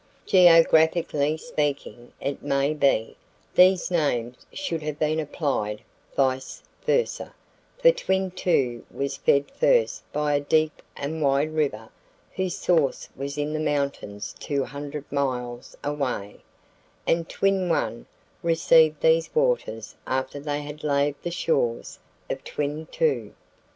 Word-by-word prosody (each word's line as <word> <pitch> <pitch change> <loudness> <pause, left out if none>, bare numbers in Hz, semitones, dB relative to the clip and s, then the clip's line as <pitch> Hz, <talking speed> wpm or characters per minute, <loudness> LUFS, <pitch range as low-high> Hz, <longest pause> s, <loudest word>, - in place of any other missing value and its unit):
Geographically 160 -3 +5
speaking, 145 - -3
it 140 0 -3
may 140 +2 +1
be, 140 -7 +1 0.4
these 185 0 +5
names 125 -8 -1
should 170 - -3
have 150 -1 -4
been 155 +1 +1
applied 140 -9 -2 0.3
vice 130 -1 0 0.2
versa, 480 -1 0 0.4
for - - +6
Twin 190 - -1
Two 135 -10 0
was 140 0 -3
fed 140 0 +2
first - - +2
by 150 0 0
a 145 - +3
deep 155 +2 +1 0.2
and 155 +3 -4
wide 140 +2 +2
river 135 -8 -1 0.5
whose 185 -2 -2
source 160 -7 +1
was 140 +2 -5
in 150 +1 -2
the 155 - -1
mountains 140 -9 -2
200 145 +1 -4
miles 125 -3 -3
away, 135 -8 -3 0.7
and 165 0 +1
Twin 195 -2 +1
One 115 -7 -1 0.3
received 160 -2 +4
these 160 0 +3
waters 470 - 0
after 130 +2 -2
they 145 0 -3
had 150 +1 -9
laved 145 -1 +1
the 175 - -3
shores 135 -8 -1 0.3
of - - -4
Twin 150 +2 -3
Two. 475 - -1
150 Hz, 125 wpm, -25 LUFS, 140-165 Hz, 0.7 s, for